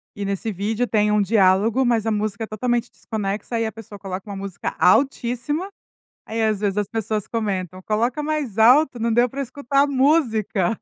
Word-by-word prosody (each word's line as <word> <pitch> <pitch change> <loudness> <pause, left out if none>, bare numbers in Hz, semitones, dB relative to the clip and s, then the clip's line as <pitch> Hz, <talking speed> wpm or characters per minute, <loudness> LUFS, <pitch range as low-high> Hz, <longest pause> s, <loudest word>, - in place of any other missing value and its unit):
e 205 - -5
nesse 200 +2 -2
vídeo 215 +5 -1
tem 210 -3 +1
um 210 - +3
diálogo, 205 +4 +3
mas 235 -3 +1
a 225 - +1
música 215 0 -2
totalmente 240 +2 -2
desconexa 215 +1 -4
e 225 - 0
a 220 - -3
pessoa 220 -2 -11
coloca 195 +1 -7
uma 200 - -5
música 195 -2 -5
altíssima, 245 - +1 0.6
aí 225 +1 -3
às 215 -2 +1
vezes 200 -1 -1
as 205 -1 0
pessoas 220 -2 -3
comentam: 190 -5 -3
"coloca 235 +8 -1
mais 295 -8 -2
alto, 250 +4 +5
não 230 +1 0
deu 240 +2 +4
para 275 +4 -5
escutar 275 +1 0
a 285 - +3
música". 240 - +1
220 Hz, 185 wpm, -22 LUFS, 205-245 Hz, 0.6 s, alto